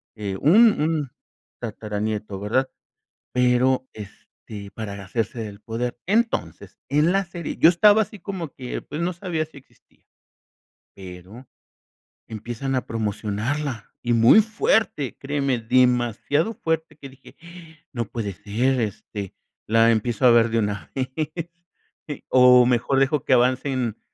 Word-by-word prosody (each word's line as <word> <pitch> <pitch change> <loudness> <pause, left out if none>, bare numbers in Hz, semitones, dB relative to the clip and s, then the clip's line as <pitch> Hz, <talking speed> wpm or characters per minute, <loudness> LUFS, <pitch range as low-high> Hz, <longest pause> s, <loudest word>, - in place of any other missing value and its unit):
eh, 100 -3 -4
un 210 +6 +5
un 150 -4 -1 0.5
tataranieto, 105 -2 -4
¿verdad? 120 +6 0 0.6
Pero, 125 +1 +2
este, 100 0 -11
para 100 -3 -6
hacerse 115 +4 -3
del 105 -2 -7
poder. 120 +1 -4
Entonces, 210 - -1
en 150 +5 +3
la 195 0 +1
serie, 170 -2 -6
yo 160 - +7
estaba 205 +5 +5
así 210 0 -12
como 180 -4 -5
que 125 -2 -6
pues, 150 - -6
no 180 +2 -1
sabía 170 -3 -3
si 155 -2 -17
existía. 135 - -22 0.9
Pero 95 +6 -11 0.8
empiezan 120 +4 -4
a 130 - -1
promocionarla, 110 +3 -3
y 120 - +1
muy 115 - +7
fuerte, 215 - 0
créeme, 140 -2 -1
demasiado 125 - +1
fuerte, 160 -5 -3
que 135 -2 -10
dije: 130 0 -17 0.6
"No 120 -2 -2
puede 105 -2 -5
ser. 125 +8 -1
Este, 100 -2 -5 0.3
la 115 +1 +4
empiezo 115 +3 0
a 125 - +8
ver 115 -1 +5
de 115 0 +1
una 100 -5 -3
vez. 130 -1 -2 1.2
O 125 -1 +7
mejor 125 +2 +1
dejo 135 +1 +1
que - - -1
avancen 125 -2 +1
125 Hz, 130 wpm, -23 LUFS, 110-145 Hz, 1.2 s, a